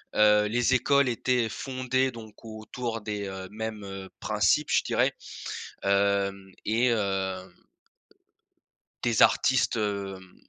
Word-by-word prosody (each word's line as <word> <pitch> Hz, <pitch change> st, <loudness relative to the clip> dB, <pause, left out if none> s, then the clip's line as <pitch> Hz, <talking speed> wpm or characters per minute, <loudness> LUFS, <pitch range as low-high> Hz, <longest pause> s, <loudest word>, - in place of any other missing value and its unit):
Heu, 105 Hz, 0 st, +5 dB
les 120 Hz, +3 st, +2 dB
écoles 140 Hz, +1 st, +3 dB
étaient 120 Hz, -1 st, 0 dB
fondées, 130 Hz, +1 st, -1 dB
donc, 115 Hz, -1 st, -12 dB
autour 115 Hz, +1 st, -5 dB
des, 105 Hz, -1 st, -4 dB
heu, 95 Hz, -1 st, -6 dB
mêmes, 110 Hz, -1 st, -5 dB
heu, 95 Hz, -1 st, -7 dB
principes, -, -, +2 dB
je -, -, +3 dB
dirais. -, -, +1 dB, 0.7 s
Hem 100 Hz, -1 st, +1 dB
et 120 Hz, +3 st, +2 dB
heu 95 Hz, -3 st, -2 dB, 1.5 s
des 120 Hz, -2 st, +2 dB
artistes, 130 Hz, -4 st, +4 dB
hem, 100 Hz, -3 st, -3 dB
105 Hz, 115 wpm, -27 LUFS, 100-120 Hz, 1.5 s, Heu